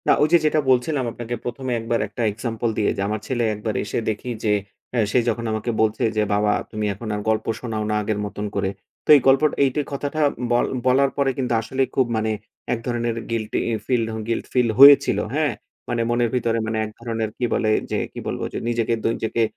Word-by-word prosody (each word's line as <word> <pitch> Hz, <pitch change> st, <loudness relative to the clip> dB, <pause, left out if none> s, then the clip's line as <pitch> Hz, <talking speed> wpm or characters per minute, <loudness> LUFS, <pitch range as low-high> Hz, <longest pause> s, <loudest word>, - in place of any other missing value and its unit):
না -, -, +6 dB
ওইযে 160 Hz, +3 st, +5 dB
যেটা 155 Hz, 0 st, +3 dB
বলছিলাম 130 Hz, +2 st, +2 dB
আপনাকে 120 Hz, 0 st, -5 dB
১ম 125 Hz, +2 st, -5 dB
এ -, -, +2 dB
১ 115 Hz, -, -8 dB
বার 115 Hz, -, +2 dB
একটা 105 Hz, +4 st, -6 dB
এক্সাম্পল 115 Hz, +2 st, -3 dB
দিয়ে 105 Hz, -, +2 dB
যে -, -, -1 dB
আমার 105 Hz, +1 st, -2 dB
ছেলে 120 Hz, -2 st, 0 dB
১ 105 Hz, -, -7 dB
বার 110 Hz, -2 st, -1 dB
এসে 105 Hz, -, -2 dB
দেখি 110 Hz, +3 st, -4 dB
যে 105 Hz, -, +3 dB, 0.4 s
এ -, -, +3 dB
সে 125 Hz, -, +4 dB
যখন 115 Hz, +1 st, -2 dB
আমাকে 110 Hz, +2 st, -2 dB
বলছে 110 Hz, +3 st, +1 dB
যে, 105 Hz, -, +3 dB
"বাবা 105 Hz, +1 st, +2 dB, 0.2 s
তুমি 105 Hz, 0 st, -2 dB
এখন 110 Hz, +4 st, -8 dB
আর 105 Hz, -, -3 dB
গল্প 110 Hz, 0 st, +1 dB
শোনাও 110 Hz, -3 st, -3 dB
না -, -, +1 dB
আগের 105 Hz, 0 st, -2 dB
মতন 105 Hz, 0 st, -5 dB
করে।" 95 Hz, -1 st, 0 dB, 0.4 s
তো -, -, -17 dB
এই 140 Hz, -, +5 dB
গল্প 135 Hz, 0 st, +6 dB, 0.2 s
এই 135 Hz, -, +4 dB, 0.2 s
কথাটা 145 Hz, +2 st, -2 dB, 0.3 s
ব -, -, +4 dB, 0.3 s
বলার 135 Hz, +2 st, +4 dB
পরে 140 Hz, -1 st, +2 dB
কিন্তু 125 Hz, -3 st, -1 dB
আসলেই 130 Hz, +4 st, -1 dB
খুব 130 Hz, -, +4 dB
মানে 110 Hz, 0 st, 0 dB, 0.4 s
এক 115 Hz, -, -2 dB
ধরনের 120 Hz, -1 st, -1 dB, 0.2 s
গিল্টি 110 Hz, -2 st, -1 dB, 0.2 s
ফিল 125 Hz, -3 st, +1 dB, 0.3 s
গিল্ট 115 Hz, -, -1 dB
ফিল 125 Hz, -2 st, +3 dB
হয়েছিল। 140 Hz, +1 st, +8 dB, 0.2 s
হ্যাঁ? 155 Hz, -1 st, +1 dB, 0.4 s
মানে 120 Hz, -1 st, 0 dB
মনের 120 Hz, 0 st, +2 dB
ভিতরে 115 Hz, -2 st, +1 dB
মানে 110 Hz, 0 st, -1 dB
এক 110 Hz, -, -8 dB
ধরনের 115 Hz, -2 st, -2 dB
কি 125 Hz, -, 0 dB
বলে? 110 Hz, -, +1 dB, 0.2 s
যে -, -, +1 dB, 0.2 s
কি -, -, -6 dB
বলবো? -, -, -3 dB
যে -, -, -3 dB
নিজেকে 115 Hz, -1 st, 0 dB
দ -, -, -6 dB
নিজেকে 115 Hz, +1 st, -2 dB
115 Hz, 220 wpm, -22 LUFS, 110-130 Hz, 0.4 s, হয়েছিল